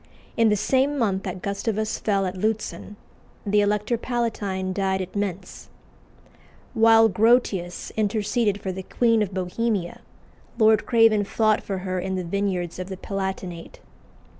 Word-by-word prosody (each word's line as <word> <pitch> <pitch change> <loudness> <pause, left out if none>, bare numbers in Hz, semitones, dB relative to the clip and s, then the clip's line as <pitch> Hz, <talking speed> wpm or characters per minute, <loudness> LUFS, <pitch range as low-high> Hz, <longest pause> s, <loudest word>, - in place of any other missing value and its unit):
In 230 -1 +4
the 210 - +3
same 265 +7 +1
month 200 -6 0
that 185 -1 -5
Gustavus 215 +2 -2
fell 200 -2 0
at 185 - -3
Lutzen, 215 +1 -3 0.5
the 205 0 +3
Elector 210 +3 0
Palatine 205 -7 -2
died 190 0 0
at 185 +1 -6
Mentz. 195 -2 -4 1.1
While 225 0 +6
Grotius 210 -5 +1
interceded 210 0 0
for 190 - -4
the 190 +1 -6
Queen 230 +3 +1
of 205 -2 -1
Bohemia, 185 0 -2 0.6
Lord 220 -1 +4
Craven 225 -3 +4
fought 215 +1 +1
for 195 - -4
her 185 0 -2
in 190 +1 -3
the 185 - -2
vineyards 180 -1 -2
of 185 +1 -5
the 190 - -6
Palatinate. 190 -3 -5
205 Hz, 140 wpm, -24 LUFS, 190-220 Hz, 1.1 s, While